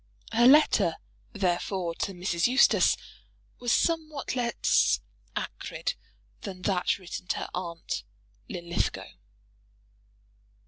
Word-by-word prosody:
Her 240 Hz, +2 st, +5 dB
letter, 300 Hz, +4 st, +5 dB, 0.4 s
therefore, 180 Hz, -2 st, -1 dB
to 195 Hz, +3 st, -3 dB
Mrs. 180 Hz, 0 st, +1 dB
Eustace 255 Hz, +2 st, +5 dB, 0.6 s
was 245 Hz, -1 st, -1 dB
somewhat 310 Hz, -4 st, 0 dB
less 240 Hz, -2 st, +2 dB, 0.4 s
acrid -, -, -3 dB, 0.5 s
than 185 Hz, -3 st, -7 dB
that 185 Hz, -3 st, +1 dB
written 180 Hz, -1 st, -8 dB
to -, -, 0 dB
her -, -, -4 dB
aunt 170 Hz, -2 st, -4 dB, 0.5 s
Linlithgow. 170 Hz, -1 st, -2 dB
195 Hz, 95 wpm, -28 LUFS, 175-245 Hz, 0.6 s, Her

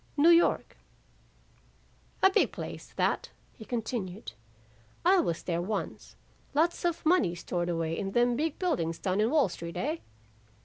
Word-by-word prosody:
"'New 305 Hz, +4 st, +6 dB
York.' 340 Hz, 0 st, +3 dB, 1.5 s
"'A 385 Hz, -, +7 dB
big -, -, +3 dB
place -, -, -7 dB
that,' -, -, 0 dB, 0.2 s
he 220 Hz, -, -11 dB
continued. 225 Hz, -4 st, -4 dB, 0.7 s
'I 375 Hz, +1 st, +6 dB
was 170 Hz, -, -1 dB
there 170 Hz, -1 st, -1 dB
once, 200 Hz, +3 st, -4 dB, 0.4 s
lots 330 Hz, +4 st, +2 dB
of 340 Hz, -2 st, -1 dB
money 270 Hz, -, +3 dB
stored 175 Hz, 0 st, -3 dB
away 165 Hz, -1 st, -1 dB
in 195 Hz, +1 st, -4 dB
them 240 Hz, 0 st, +3 dB
big 310 Hz, +3 st, -1 dB
buildings 210 Hz, -, -1 dB
down 190 Hz, +3 st, 0 dB
in 220 Hz, -, +2 dB
Wall 295 Hz, -4 st, +4 dB
Street, 170 Hz, -1 st, -7 dB
eh? 305 Hz, +5 st, -1 dB
225 Hz, 145 wpm, -29 LUFS, -, 1.5 s, A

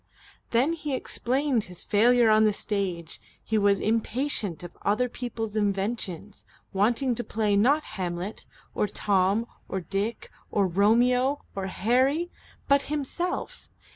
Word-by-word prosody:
Then 255 Hz, +8 st, +2 dB
he 300 Hz, -4 st, -3 dB
explained 260 Hz, -2 st, -1 dB
his 180 Hz, -1 st, -8 dB
failure 235 Hz, +2 st, +4 dB
on 215 Hz, 0 st, +5 dB
the 215 Hz, -1 st, +4 dB
stage. 190 Hz, -6 st, -3 dB, 0.2 s
He 220 Hz, -1 st, +1 dB
was 200 Hz, -1 st, +3 dB
impatient 225 Hz, -, 0 dB
of 175 Hz, -, -9 dB
other 215 Hz, +5 st, +1 dB
people's 225 Hz, -3 st, -5 dB
inventions, 200 Hz, -2 st, -2 dB, 0.3 s
wanting 235 Hz, +6 st, +2 dB
to 240 Hz, -, -3 dB
play 215 Hz, -2 st, 0 dB
not 275 Hz, +9 st, +4 dB
Hamlet 180 Hz, +2 st, -5 dB, 0.3 s
or 210 Hz, -, 0 dB
Tom 200 Hz, +2 st, +1 dB, 0.2 s
or 190 Hz, -, -2 dB
Dick 195 Hz, +6 st, -3 dB, 0.2 s
or 200 Hz, -, +2 dB
Romeo 245 Hz, +9 st, +3 dB
or 195 Hz, -1 st, -3 dB
Harry, 260 Hz, -, +1 dB, 0.4 s
but 280 Hz, 0 st, +5 dB
himself. 345 Hz, -, -3 dB
220 Hz, 130 wpm, -27 LUFS, 200-250 Hz, 0.4 s, on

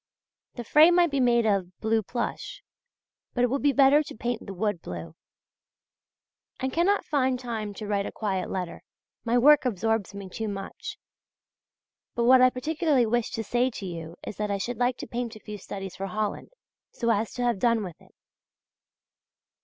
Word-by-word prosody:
The 240 Hz, -, -5 dB
frame 310 Hz, +8 st, +6 dB
might 350 Hz, -3 st, +4 dB
be 280 Hz, -, 0 dB
made 240 Hz, -2 st, +3 dB
of 190 Hz, -4 st, 0 dB
blue 220 Hz, 0 st, +1 dB
plush; 240 Hz, -, -4 dB, 0.7 s
but 245 Hz, -, +2 dB
it 245 Hz, -, +2 dB
would 275 Hz, -, 0 dB
be 285 Hz, -, +4 dB
better 275 Hz, +2 st, +5 dB
to 305 Hz, -, -8 dB
paint 240 Hz, 0 st, -2 dB
the -, -, -5 dB
wood 205 Hz, -2 st, -1 dB
blue.... 85 Hz, -2 st, -7 dB, 1.5 s
I 260 Hz, -, -1 dB
cannot 350 Hz, +8 st, +1 dB
find 260 Hz, -3 st, +1 dB
time 225 Hz, -4 st, -4 dB
to 215 Hz, -, -6 dB
write 200 Hz, -1 st, -1 dB
a -, -, -6 dB
quiet 190 Hz, -4 st, -2 dB
letter; 180 Hz, -2 st, -4 dB, 0.4 s
my 235 Hz, +1 st, +2 dB
work 295 Hz, +4 st, +6 dB
absorbs 225 Hz, -3 st, -1 dB
me 200 Hz, -1 st, -7 dB
too 220 Hz, +4 st, -4 dB
much. 195 Hz, -1 st, -6 dB, 1.2 s
But 235 Hz, -, +1 dB
what 255 Hz, +2 st, +7 dB
I 255 Hz, -, +7 dB
particularly 295 Hz, 0 st, +1 dB
wished 240 Hz, +2 st, 0 dB
to 225 Hz, -, -2 dB
say 245 Hz, +4 st, +1 dB
to 215 Hz, -5 st, -7 dB
you 170 Hz, -2 st, -7 dB
is -, -, -6 dB
that 210 Hz, 0 st, -2 dB
I 200 Hz, -, 0 dB
should 235 Hz, +5 st, -4 dB
like 245 Hz, 0 st, +1 dB
to -, -, -7 dB
paint 235 Hz, -1 st, -4 dB
a -, -, -10 dB
few 210 Hz, -1 st, -8 dB
studies 195 Hz, -1 st, -7 dB
for 195 Hz, -, -4 dB
Holland, 210 Hz, +2 st, -3 dB, 0.4 s
so 235 Hz, -1 st, -1 dB
as 220 Hz, 0 st, 0 dB
to 245 Hz, -, -2 dB
have 240 Hz, -5 st, +1 dB
done 230 Hz, -1 st, +2 dB
with 180 Hz, -4 st, -8 dB
it. -, -, -22 dB
230 Hz, 185 wpm, -27 LUFS, 200-255 Hz, 1.5 s, what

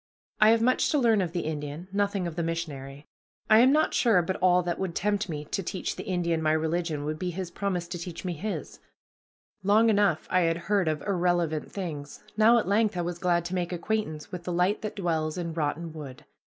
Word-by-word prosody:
I 215 Hz, -, +7 dB
have 225 Hz, 0 st, +4 dB
much 255 Hz, +2 st, +3 dB
to 300 Hz, -, +2 dB
learn 230 Hz, -6 st, +3 dB
of 175 Hz, -3 st, -2 dB
the 175 Hz, 0 st, -2 dB
Indian, 150 Hz, +2 st, -5 dB
nothing 200 Hz, -2 st, 0 dB
of 170 Hz, -2 st, -4 dB
the 170 Hz, -, -1 dB
missionary. 145 Hz, -4 st, -5 dB, 0.5 s
I 215 Hz, -, +8 dB
am 255 Hz, +3 st, +6 dB
not 310 Hz, +2 st, +2 dB
sure 215 Hz, -8 st, +4 dB
but 185 Hz, +3 st, -2 dB
all 180 Hz, -1 st, +4 dB
that 175 Hz, -1 st, -2 dB
would 185 Hz, -3 st, -3 dB
tempt 205 Hz, -1 st, 0 dB
me 150 Hz, -2 st, -4 dB
to 195 Hz, -, -3 dB
teach 185 Hz, 0 st, -3 dB
the -, -, -7 dB
Indian 170 Hz, -3 st, 0 dB
my 155 Hz, 0 st, +2 dB
religion 160 Hz, -1 st, -1 dB
would 155 Hz, +1 st, -3 dB
be 185 Hz, -, -2 dB
his 180 Hz, 0 st, -5 dB
promise 185 Hz, -4 st, -2 dB
to 175 Hz, -1 st, -5 dB
teach 170 Hz, +1 st, -7 dB
me 180 Hz, -, -1 dB
his. 170 Hz, -1 st, -5 dB, 0.8 s
Long 215 Hz, +4 st, +4 dB
enough 200 Hz, -7 st, +2 dB
I 185 Hz, -, +4 dB
had 165 Hz, -1 st, +2 dB
heard 195 Hz, 0 st, 0 dB
of 155 Hz, -2 st, -1 dB
irrelevant 175 Hz, -5 st, 0 dB
things; 155 Hz, -7 st, -6 dB
now 225 Hz, +2 st, +6 dB
at 220 Hz, -, 0 dB
length 210 Hz, 0 st, +2 dB
I -, -, +1 dB
was 175 Hz, 0 st, -4 dB
glad 175 Hz, -2 st, +1 dB
to 175 Hz, -, -4 dB
make 180 Hz, -1 st, -1 dB
acquaintance 175 Hz, -4 st, -3 dB
with 180 Hz, -1 st, -6 dB
the 180 Hz, -, -4 dB
light 180 Hz, +4 st, +1 dB
that 215 Hz, -, -5 dB
dwells 160 Hz, -4 st, -1 dB
in 170 Hz, -2 st, -3 dB
rotten 160 Hz, +1 st, -2 dB
wood. 140 Hz, -5 st, -9 dB
175 Hz, 220 wpm, -27 LUFS, 160-200 Hz, 0.8 s, I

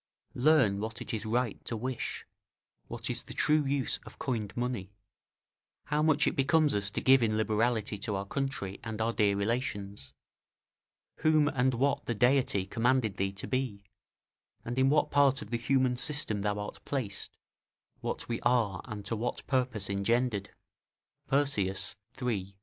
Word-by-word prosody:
["Learn 125 Hz, -7 st, +4 dB
what 110 Hz, +2 st, -4 dB
it 125 Hz, -, -6 dB
is 110 Hz, 0 st, -3 dB
right 120 Hz, 0 st, -1 dB
to 115 Hz, -, -3 dB
wish; 125 Hz, +2 st, -4 dB, 0.6 s
what -, -, -5 dB
is -, -, -1 dB
the -, -, -11 dB
true 150 Hz, 0 st, +3 dB
use 140 Hz, -1 st, 0 dB
of -, -, -13 dB
coined 110 Hz, -6 st, -3 dB
money; 120 Hz, -6 st, -3 dB, 0.9 s
how 150 Hz, 0 st, 0 dB
much 155 Hz, -2 st, +3 dB
it -, -, +1 dB
becomes 150 Hz, +2 st, +3 dB
us 100 Hz, -1 st, 0 dB
to 100 Hz, -, -3 dB
give 130 Hz, 0 st, +6 dB
in 110 Hz, -2 st, +1 dB
liberality 110 Hz, -1 st, 0 dB
to 105 Hz, 0 st, -2 dB
our 95 Hz, +1 st, -2 dB
country 115 Hz, -6 st, -3 dB
and 110 Hz, -1 st, -5 dB
our 115 Hz, +1 st, +1 dB
dear 100 Hz, -2 st, +3 dB
relations; 100 Hz, -, -2 dB, 1.1 s
whom 155 Hz, -1 st, +4 dB
and 130 Hz, -2 st, +1 dB
what 135 Hz, +3 st, 0 dB
the 120 Hz, -, 0 dB
Deity 125 Hz, -4 st, +3 dB
commanded 115 Hz, -2 st, +1 dB
thee 95 Hz, 0 st, 0 dB
to 100 Hz, -, -6 dB
be; 130 Hz, -6 st, -2 dB, 0.8 s
and 120 Hz, +2 st, -2 dB
in 135 Hz, +1 st, +4 dB
what 150 Hz, +2 st, +2 dB
part 140 Hz, -1 st, +4 dB
of 105 Hz, -, -13 dB
the 120 Hz, -, +1 dB
human 130 Hz, +1 st, +2 dB
system 125 Hz, -6 st, 0 dB
thou 105 Hz, 0 st, 0 dB
art 105 Hz, 0 st, -6 dB
placed; 120 Hz, -9 st, -4 dB, 0.6 s
what -, -, -4 dB
we 115 Hz, -, -3 dB
are 115 Hz, -6 st, +2 dB
ant 105 Hz, -4 st, -7 dB
to 115 Hz, -, -2 dB
what 120 Hz, +3 st, -3 dB
purpose 125 Hz, -6 st, 0 dB
engendered." 100 Hz, +1 st, 0 dB, 0.8 s
Persius, 135 Hz, -9 st, +1 dB, 0.2 s
iii. 100 Hz, -6 st, -2 dB
120 Hz, 160 wpm, -30 LUFS, 105-130 Hz, 1.1 s, give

